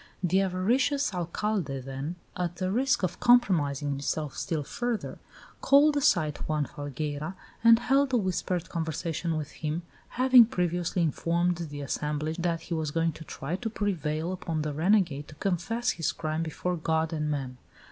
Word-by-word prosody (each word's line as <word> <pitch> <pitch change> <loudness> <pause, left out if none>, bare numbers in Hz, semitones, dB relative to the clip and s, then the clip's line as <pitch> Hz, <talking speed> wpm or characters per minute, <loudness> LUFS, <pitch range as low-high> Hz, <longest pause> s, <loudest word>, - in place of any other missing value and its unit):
The 185 +2 +3
avaricious 235 +9 +1
Alcalde, 175 -4 -2
then, 135 +5 -5 0.2
at 175 -1 -2
the 185 +1 -2
risk 255 +1 +2
of 185 - -1
compromising 155 - +3
himself 140 +1 -2
still 160 -5 -2
further, 240 - -3 0.4
called 290 +2 +5
aside 160 - +2
Juan 150 -2 0
Falgueira 145 +5 -5 0.3
and 230 0 +8
held 270 +3 +2
a 250 - +3
whispered 185 -3 -1
conversation 165 0 -2
with 150 -2 -5
him, 155 +2 -3 0.3
having 255 -2 +8
previously 175 -3 0
informed 170 +2 +1
the 145 -4 -6
assemblage 150 +3 -2
that 170 -1 -1
he 170 - -5
was 160 -2 -1
going 165 +2 +1
to 160 - -10
try 155 +1 -4
to 225 +2 -3
prevail 170 -6 -2
upon 165 -4 -3
the 150 -1 -2
renegade 165 -3 +2
to 155 - -12
confess 200 +8 -1
his 165 - -1
crime 155 0 -2
before 175 +2 -2
God 160 0 0
and 150 -1 -1
men. 135 -4 -3
170 Hz, 155 wpm, -28 LUFS, 150-195 Hz, 0.4 s, and